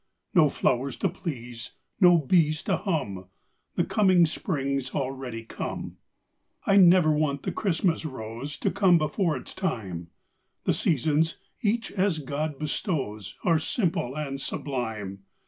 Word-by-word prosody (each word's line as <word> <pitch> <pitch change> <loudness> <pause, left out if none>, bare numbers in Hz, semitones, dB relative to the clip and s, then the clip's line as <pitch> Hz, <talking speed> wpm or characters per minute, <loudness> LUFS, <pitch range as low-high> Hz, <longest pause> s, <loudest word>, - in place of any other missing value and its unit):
No 160 -7 +6
flowers 130 0 0
to 195 - +1
please 125 -10 -6 0.3
no 175 -3 +7
bees 155 0 +2
to - - +1
hum 135 - -2 0.5
The - - +2
coming 185 -5 +4
spring's 140 -5 -2
already 130 -4 -3
come. 115 - -6 0.7
I 195 - +4
never 175 -4 +7
want 150 -2 0
the - - -1
Christmas 175 -4 0
rose 130 0 -6
To - - 0
come 190 -4 +5
before 160 0 0
its - - -8
time; 95 - -3 0.5
The - - +2
seasons, 155 +2 +1 0.2
each 230 +1 0
as 190 -3 +1
God 150 0 -3
bestows, 135 - -3
Are 165 -3 +3
simple 160 - -1
and 135 -2 -3
sublime. 110 -10 -3
150 Hz, 130 wpm, -27 LUFS, 130-175 Hz, 0.7 s, no